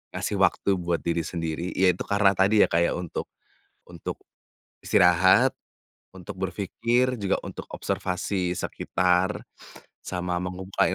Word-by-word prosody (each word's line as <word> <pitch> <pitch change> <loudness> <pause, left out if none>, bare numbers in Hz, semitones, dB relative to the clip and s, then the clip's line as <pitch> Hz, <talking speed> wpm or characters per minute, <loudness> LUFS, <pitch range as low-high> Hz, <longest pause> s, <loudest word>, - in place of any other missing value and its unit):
Ngasih - - -2
waktu 100 - +2
buat 85 -2 -1
diri 85 0 -1
sendiri, 85 +1 -4
ya 95 - +2
itu - - -5
karena 100 -1 +3
tadi 100 +3 +3
ya, - - +6
kayak 85 +1 +2
untuk 90 -3 -5 0.5
untuk 85 -2 -7 0.7
istirahat, 90 +1 +5 0.7
untuk 95 +1 -9
berpikir, 115 +6 0
juga 100 -1 +1
untuk - - -8
observasi 90 -1 -2
sekitar, 90 +1 0 0.6
sama 90 -1 -3
men-supply 90 +2 -1
90 Hz, 120 wpm, -25 LUFS, 90-95 Hz, 0.7 s, ya